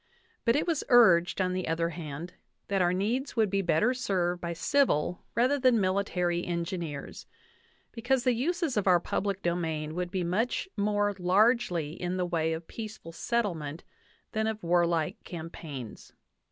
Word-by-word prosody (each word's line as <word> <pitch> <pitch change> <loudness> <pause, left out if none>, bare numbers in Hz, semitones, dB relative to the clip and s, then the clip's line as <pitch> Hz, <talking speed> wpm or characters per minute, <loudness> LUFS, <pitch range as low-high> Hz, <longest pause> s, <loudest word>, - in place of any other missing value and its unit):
But 230 0 +4
it 295 - +1
was 330 -4 0
urged, 185 -9 +6
on 185 -1 +1
the 185 0 -2
other 165 +1 0
hand, 165 0 -7 0.4
that 195 -1 +1
our 175 -1 +3
needs 230 +9 -1
would 220 -4 +2
be 195 0 +2
better 190 +7 +2
served 180 -8 -1
by 170 0 -3
civil 180 - +1
rather 255 +5 +3
than 255 -3 +4
by 190 - +2
mili 200 +1 +1
tary 175 -1 0
engineers, 170 -4 -4 0.6
because 245 +2 0
the 255 - +3
uses 315 - -1
of 200 - 0
our 180 -2 +6
public 195 +2 -2
domain 160 -3 -1
would 180 +1 -2
be 185 -1 -2
much 210 - 0
more 205 0 +1
largely 185 -4 +2
in 180 +1 -2
the 180 - 0
way 165 -2 0
of 160 +1 -5
peaceful 215 -6 -8
settlement 165 -7 -2 0.5
than 220 0 0
of 220 -1 -3
warlike 170 -2 +1
campaigns. 160 - -8
185 Hz, 165 wpm, -29 LUFS, 170-220 Hz, 0.6 s, urged